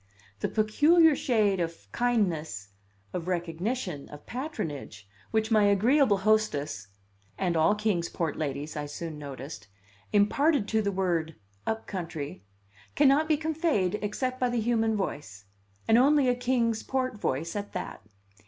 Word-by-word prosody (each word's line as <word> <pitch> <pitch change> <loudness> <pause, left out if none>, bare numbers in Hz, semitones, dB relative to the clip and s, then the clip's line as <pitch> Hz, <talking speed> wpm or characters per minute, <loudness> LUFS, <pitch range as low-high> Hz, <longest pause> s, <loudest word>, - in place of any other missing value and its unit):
The - - -1
peculiar 300 +9 +4
shade 220 -10 +2
of 165 -11 -4
kindness, 165 - 0 0.4
of 175 -1 -4
recognition, 175 - -3
of 145 0 -11
patronage, 160 - -5 0.2
which 220 0 0
my 215 -2 +5
agreeable 215 +3 +4
hostess 190 - 0 0.5
(and 180 -3 0
all 165 +6 +4
Kings 205 -6 0
Port 165 -4 -2
ladies, 150 0 -4
I 145 -1 -3
soon 155 +1 -6
noticed) 135 -6 -8 0.4
imparted 225 +5 +3
to 220 -1 +2
the 200 -1 0
word 170 -5 -1 0.3
"up 220 0 -2
country" 160 - -5 0.5
cannot 290 +2 +4
be 310 -1 +3
conveyed 305 - 0
except 255 +5 -2
by 250 - +2
the 240 -1 0
human 225 -1 +1
voice 105 - -5 0.4
and 225 +1 +6
only 280 +1 +4
a 250 - +4
Kings 240 -2 0
Port 255 -4 -2
voice 160 +8 -2
at 205 0 -5
that. - - -5
205 Hz, 140 wpm, -28 LUFS, 160-245 Hz, 0.5 s, and